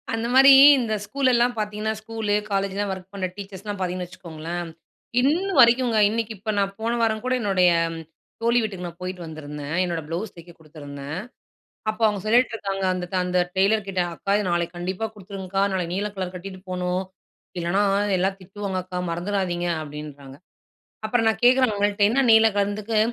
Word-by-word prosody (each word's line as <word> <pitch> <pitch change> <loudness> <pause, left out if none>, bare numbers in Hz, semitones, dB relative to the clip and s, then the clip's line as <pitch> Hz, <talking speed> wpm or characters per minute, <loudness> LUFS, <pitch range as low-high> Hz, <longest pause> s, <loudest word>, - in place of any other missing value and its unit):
அந்த 225 +1 -2
மாரி 270 +1 +8 0.3
இந்த 230 -3 -1
ஸ்கூல் 260 +4 +1
எல்லாம் 240 +1 +3
பார்த்தீங்கன்னா, 215 0 -2
ஸ்கூலு 220 -1 -3 0.2
காலேஜ்லாம் 195 0 -1
ஒர்க் 190 +1 -11
பண்ணுற 190 -2 -2
டீச்சர்ஸ்லாம் 200 +1 -7
பார்த்தீங்கன்னு 180 -1 -3
வச்சுக்கோங்களேன், 170 -1 -7 0.5
இன்ன 325 +9 +1
வரைக்குங்க, 240 -1 +5
இன்னைக்கு 225 0 -2
இப்ப 215 +3 -3
நான் 195 0 0
போன 225 +1 -1
வாரம் 220 -1 0
கூட 255 - +1
என்னுடைய 190 -4 +3 0.7
தோழி 235 +1 +3
வீட்டுக்கு 195 -5 -4
நான் 170 +1 -11
போயிட்டு 180 0 -5
வந்திருந்தேன். 150 -1 -6
என்னோட 170 -2 -2
ப்ளவுஸ் 180 +6 -4
தைக்க 170 0 -13
குடுத்துருந்தேன். 145 0 -8 0.7
அப்போ 215 +1 -7
அவங்க 210 -2 0
சொல்லிட்டுருக்காங்க 215 -4 +1
அந்த 180 -1 -3
ட் - - 0
அந்த 180 0 0 0.2
டெய்லர் 200 +2 +2
கிட்ட, 190 -1 -1
"அக்கா! 195 +4 -2
இத 210 - -1
நாளைக்கு 175 0 -1
கண்டிப்பா 185 +5 -3
குடுத்துருங்கக்கா. 195 -1 -4
நாளைக்கு 180 -2 -2
நீல 205 +2 -1
கலர் 185 -1 -4
கட்டிட்டு 185 +1 -8
போகணும், 180 0 -1 0.6
இல்லைன்னா 175 +4 +1 0.4
எல்லாம் 190 +2 0
திட்டுவாங்க 195 +1 -5
அக்கா, 185 -1 -5
மறந்துடாதீங்க." 175 0 -2 0.2
அப்படீன்றாங்க. 145 -2 -9 0.7
அப்பறம் 225 0 +2
நான் 220 - -1
கேட்குறேன் 255 -1 +5
அவுங்கள்ட்ட, 205 0 +1
என்ன 270 +4 +2
நீல 220 0 +7
கலர்ன்னதுக்கு, 205 +2 0
195 Hz, 160 wpm, -24 LUFS, 180-220 Hz, 0.7 s, மாரி